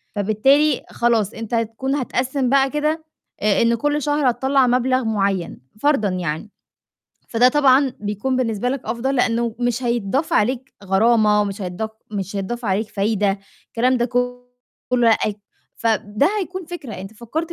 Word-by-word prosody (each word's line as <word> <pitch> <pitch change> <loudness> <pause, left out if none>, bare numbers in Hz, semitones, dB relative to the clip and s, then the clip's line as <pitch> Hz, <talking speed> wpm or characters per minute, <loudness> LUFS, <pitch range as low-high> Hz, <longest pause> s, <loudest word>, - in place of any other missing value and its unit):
فبالتالي 255 +8 +3
خلاص 230 -3 +1
أنت 225 +1 -7
هتكون 230 +4 -1
هتقسِّم 260 -1 -1
بقى 270 0 +4
كده 305 +2 -1 0.4
آآ 210 -1 +3
إن 230 0 +3
كل 295 +5 0
شهر 290 -1 +2
هتطلَّع 265 +2 +2
مبلغ 255 +1 +2
مُعيّن 200 -5 -1 0.2
فرضًا 275 -6 +2
يعني. 175 0 -3 0.8
فده 245 +2 +4
طبعًا 270 -1 +4
بيكون 210 +5 -2
بالنسبة 235 -2 0
لك 270 +1 -2
أفضل 255 +4 -1
لإنّه 235 -2 +1
مش 245 0 -1
هيتضاف 240 +4 -1
عليك 255 +4 0
غرامة 210 +1 +3
مش 200 +1 -5
هيتضاف 185 +4 -4 0.2
مش 200 -1 -4
هيتضاف 235 +5 -4
عليك 205 +1 0
فايدة. 200 -1 0 0.3
الكلام 255 +2 +1
ده 240 - +1
ك 250 - -6 0.8
كُلّه 240 -2 +4
أأي 210 -1 -3 0.4
فب 215 -2 -1
ده 285 - +5
هيكون 370 0 -5
فكرة، 320 -9 -7
أنت 195 +2 -8
فكّرت 310 +10 -4
235 Hz, 150 wpm, -21 LUFS, 210-265 Hz, 0.8 s, ده